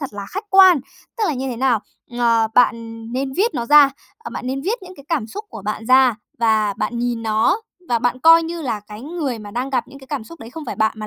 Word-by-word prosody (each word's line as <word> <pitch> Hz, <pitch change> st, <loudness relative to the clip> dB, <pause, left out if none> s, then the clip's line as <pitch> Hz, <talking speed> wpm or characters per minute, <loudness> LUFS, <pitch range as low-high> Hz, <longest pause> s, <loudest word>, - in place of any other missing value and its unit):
thật 275 Hz, -6 st, -5 dB
là 200 Hz, -1 st, -7 dB
khách 400 Hz, +3 st, -4 dB
quan. 375 Hz, -6 st, +7 dB, 0.4 s
Tức 435 Hz, -, +1 dB
là 310 Hz, -, 0 dB
như 265 Hz, +1 st, -3 dB
thế 240 Hz, -, -4 dB
nào? 245 Hz, -4 st, +2 dB, 0.4 s
Ờ, 230 Hz, -2 st, +3 dB
bạn 230 Hz, -2 st, +1 dB
nên 265 Hz, +1 st, -2 dB
viết 415 Hz, -, 0 dB
nó 235 Hz, -, -2 dB
ra, 295 Hz, -1 st, +7 dB, 0.3 s
ờ, 450 Hz, -, -9 dB
bạn 255 Hz, -, -6 dB
nên 270 Hz, +1 st, -2 dB
viết 425 Hz, +5 st, -2 dB
những 370 Hz, 0 st, -11 dB
cái 280 Hz, -, -14 dB
cảm 305 Hz, -10 st, -1 dB
xúc 420 Hz, -, -7 dB
của -, -, -9 dB
bạn 215 Hz, +2 st, -4 dB
ra 255 Hz, -1 st, +5 dB, 0.2 s
và 220 Hz, -3 st, +2 dB
bạn 235 Hz, +1 st, -2 dB
nhìn 240 Hz, -1 st, -2 dB
nó, 220 Hz, -, +1 dB, 0.3 s
và 235 Hz, -1 st, +2 dB
bạn 245 Hz, +2 st, 0 dB
coi 330 Hz, +2 st, +7 dB
như 335 Hz, 0 st, -5 dB
là 225 Hz, -6 st, -2 dB
cái 210 Hz, 0 st, -10 dB
người 290 Hz, -5 st, -3 dB
mà 205 Hz, -1 st, -9 dB
đang 250 Hz, +5 st, -3 dB
gặp 255 Hz, -3 st, -1 dB
những 275 Hz, -, -13 dB
cái 265 Hz, -, -15 dB
cảm 275 Hz, -6 st, -4 dB
xúc 335 Hz, +5 st, -13 dB
đấy 225 Hz, -, -10 dB
không 315 Hz, +3 st, -8 dB
phải 245 Hz, -, -5 dB
bạn 220 Hz, 0 st, +2 dB
mà 215 Hz, -1 st, -6 dB
255 Hz, 265 wpm, -20 LUFS, 225-305 Hz, 0.4 s, quan